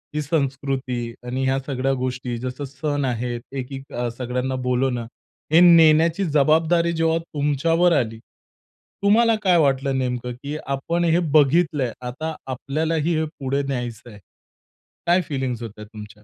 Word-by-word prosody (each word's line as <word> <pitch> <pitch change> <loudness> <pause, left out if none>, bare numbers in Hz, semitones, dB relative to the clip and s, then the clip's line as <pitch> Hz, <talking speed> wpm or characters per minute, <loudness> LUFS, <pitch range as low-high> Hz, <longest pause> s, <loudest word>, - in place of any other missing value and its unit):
ही 150 - 0
संस्कृती 135 -5 -2
आणि 125 +2 -3
ह्या 135 +1 +1
सगळ्या 135 -1 0
गोष्टी 125 -1 -3
जसं 125 +3 -5
सण 140 +1 -2
आहेत 120 -1 -2 0.2
एकीक 135 +1 -7 0.2
सगळ्यांना 125 +1 -2
बोलवणं 125 -1 0 0.5
हे 165 - +8 0.2
नेण्याची 165 +3 +5
जबाबदारी 160 +3 +3
जेव्हा 165 0 +1
तुमच्यावर 165 +2 +1
आली, 110 -2 -3 0.8
तुम्हाला 225 +3 +5
काय 180 -3 +4
वाटलं 135 -3 +2
नेमकं, 125 -1 -2
की 140 +5 -6
आपण 140 +6 -1
हे 165 +1 +3
बघितलंय, 150 -3 +3
आता 150 +6 -5 0.2
आपल्यालाही 155 +5 -1
हे 160 - 0
पुढे 140 +1 -1
न्यायचं 120 -3 -4
आहे. 105 -3 -13 0.9
काय 175 +2 +4
फीलिंग्स 130 -4 -3
होत्या 105 -1 -8
तुमच्या, 105 0 -12
135 Hz, 135 wpm, -22 LUFS, 125-160 Hz, 0.9 s, हे